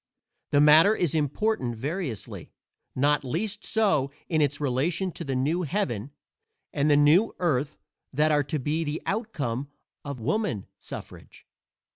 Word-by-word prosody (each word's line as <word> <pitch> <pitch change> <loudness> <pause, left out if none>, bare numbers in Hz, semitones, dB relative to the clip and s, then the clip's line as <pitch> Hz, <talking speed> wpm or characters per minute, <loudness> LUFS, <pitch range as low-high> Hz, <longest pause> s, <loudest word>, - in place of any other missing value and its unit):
The 145 - +3
matter 155 +8 +7
is 175 -8 0
important 150 - 0
variously; 140 - -5 0.4
not 145 +2 +2
least 195 - -3
so 175 -12 +2 0.2
in 160 -3 +1
its 145 -1 +1
relation 150 +7 0
to 170 - -6
the 135 -4 -3
new 150 +8 0
heaven 150 - -2 0.6
and 145 +2 +1
the 145 - +5
new 155 +9 +4
earth 150 -4 0 0.3
that 150 +3 +2
are 145 -1 +3
to 150 +3 -2
be 150 +4 -1
the 150 0 -4
outcome 145 - -3 0.3
of 140 -3 -6
woman 125 - -1
suffrage. - - -10
150 Hz, 140 wpm, -26 LUFS, 140-175 Hz, 0.6 s, matter